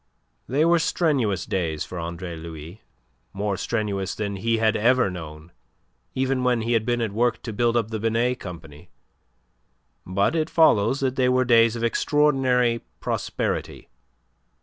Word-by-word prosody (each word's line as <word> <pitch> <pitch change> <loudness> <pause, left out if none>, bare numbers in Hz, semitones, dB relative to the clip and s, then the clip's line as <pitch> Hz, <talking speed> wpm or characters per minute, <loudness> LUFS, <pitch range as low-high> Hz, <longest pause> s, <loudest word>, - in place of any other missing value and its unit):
They 145 +5 +2
were 170 0 +4
strenuous 135 - 0
days 80 -5 -2
for 90 - -7
Andre 85 +1 -5
Louis, 80 +3 -9 0.5
more 100 0 -2
strenuous 100 -4 -2
than 100 -2 -3
he 115 +3 0
had 110 -1 +2
ever 125 -1 +3
known, 80 -2 -9 0.6
even 130 0 0
when 125 -3 +1
he 120 +1 0
had 115 0 +1
been 120 -1 +1
at 110 -3 -1
work 120 +3 0
to 115 - -5
build 120 +2 +1
up 115 -1 -1
the 110 - -3
Binet 115 +3 0
Company; 85 -2 -10 1.1
but 100 - 0
it 160 0 0
follows 135 -5 +3
that 130 -1 -1
they 130 -1 +3
were 130 0 +2
days 115 -1 +4
of 115 - -4
extraordinary 125 -3 +2 0.2
prosperity. - - -3
115 Hz, 150 wpm, -24 LUFS, 95-125 Hz, 1.1 s, were